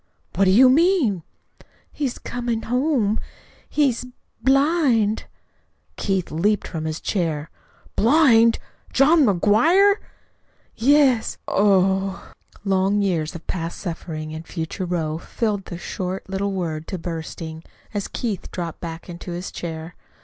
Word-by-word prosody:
"What 195 - +3
do - - +4
you 250 +7 +7
mean?" 280 - +3 0.7
"He's 275 -5 -3
coming 240 -2 -3
home. 250 -4 +1 0.5
He's 275 -6 +1 0.4
blind." 270 -6 +3 0.7
Keith 190 -3 -1
leaped 205 +7 +1
from 160 -2 -5
his 155 0 -3
chair. 160 -5 -2 0.4
"BLIND? 230 -3 +5 0.3
JOHN 300 +4 +5
McGUIRE?" 315 - +4 0.8
"Yes." 265 -1 +3
"Oh 195 -1 +2
h - - -23
h!" - - -27
Long 195 +1 +2
years 165 -5 -1
of 165 - -9
past 170 -2 -4
suffering 160 -3 -5
and 160 +1 -6
of - - -23
future 170 +2 -4
woe 160 -3 -2
filled 205 -1 -2
the 175 - -7
short 185 +2 -5
little 195 +1 -2
word 165 -5 -3
to 190 - -4
bursting, 160 -1 -6 0.3
as 205 -2 -2
Keith 220 -6 -4
dropped 170 -3 -5
back 165 -1 -7
into 175 0 -7
his 175 +2 -5
chair. 165 0 -6
195 Hz, 130 wpm, -22 LUFS, 170-240 Hz, 0.8 s, you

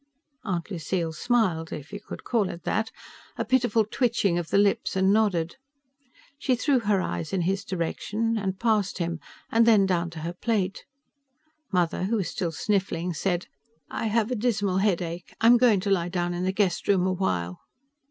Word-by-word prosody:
Aunt 180 -2 -3
Lucille 170 -1 -2
smiled, 180 -5 +1
if 150 +6 -7
you 205 - -4
could 210 - -9
call 220 -6 +1
it 170 - -8
that 220 +4 0 0.5
a 230 - -1
pitiful 235 -3 +2
twitching 215 -6 +1
of 170 - -5
the - - +2
lips 200 -1 +2
and 190 +1 +3
nodded. 195 -4 +1 0.8
She 260 -4 +2
threw 265 +1 +2
her 205 -4 +1
eyes 85 - -4
in 190 - +1
his 190 +3 0
direction, 210 +6 -2
and 195 -3 -2
past 215 -4 +1
him, 170 -2 -2 0.3
and 230 0 +4
then 210 -4 +6
down 175 -2 0
to 165 -1 -8
her 170 +2 -4
plate. 195 -1 -1 0.9
Mother, 180 -1 +1
who 220 +4 0
was 200 -5 -1
still 175 -4 -2
sniffling, 180 -1 -1
said, 175 +1 -1 0.5
"I 225 - -2
have 220 +2 +1
a - - +1
dismal 205 -5 0
headache. 180 -3 -1
I'm 235 +2 +7
going 230 -5 +4
to 200 - -1
lie 175 -3 +1
down 175 -1 -1
in 175 +1 -2
the 190 - +1
guest 190 -3 0
room 190 -3 +3
a 185 - +1
while." 90 - -2
195 Hz, 180 wpm, -26 LUFS, 175-220 Hz, 0.9 s, I'm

